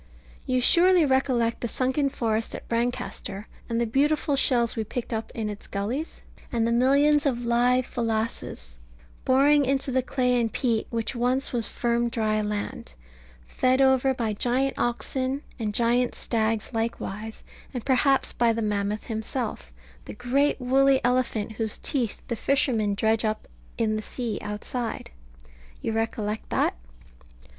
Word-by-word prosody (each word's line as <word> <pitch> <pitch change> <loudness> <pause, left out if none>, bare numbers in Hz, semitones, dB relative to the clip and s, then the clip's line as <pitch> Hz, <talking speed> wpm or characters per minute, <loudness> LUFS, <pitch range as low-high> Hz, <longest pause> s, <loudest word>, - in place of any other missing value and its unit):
You 255 0 +2
surely 350 +5 +5
recollect 260 -4 +1
the 235 - -1
sunken 260 +4 0
forest 225 -4 -1
at - - -9
Brancaster, 235 -3 -3 0.2
and 230 0 0
the 235 - +2
beautiful 285 +4 +1
shells 240 -4 +3
we 225 - -1
picked 235 +2 -5
up 225 0 -3
in 220 -2 -2
its 210 -1 -7
gullies, 230 +11 -4 0.3
and 230 -2 +1
the 230 - +1
millions 280 +5 +4
of 245 -3 -1
live 245 +2 +3
Pholases 220 - -3 0.5
boring 285 +3 +5
into 270 0 0
the 260 0 +2
clay 250 -1 +1
and 225 -1 -1
peat 230 -2 0
which 230 +1 -2
once 250 +3 0
was 235 -3 0
firm 235 0 0
dry 215 -2 0
land, 210 - -4 0.5
fed 255 - +1
over 265 0 +4
by 225 -3 -1
giant 255 +5 +1
oxen, 260 +3 -2 0.2
and 215 -2 -1
giant 240 +3 +2
stags 225 0 -1
likewise, 225 -1 -4 0.3
and 245 -3 -6
perhaps 270 0 +3
by 235 -1 +3
the 225 0 -2
mammoth 210 0 -1
himself, 220 - -4 0.3
the - - -8
great 270 +6 +1
woolly 270 +1 +4
elephant 245 -4 0
whose 220 -1 -2
teeth 245 -7 -2
the 235 - -2
fishermen 230 -5 +1
dredge 220 +2 +1
up 215 0 -2 0.3
in 215 -1 +1
the - - -3
sea 235 0 -4
outside? 215 - -4 0.7
You - - -3
recollect 220 -1 -2
that? - - +1
235 Hz, 150 wpm, -26 LUFS, 220-260 Hz, 0.7 s, surely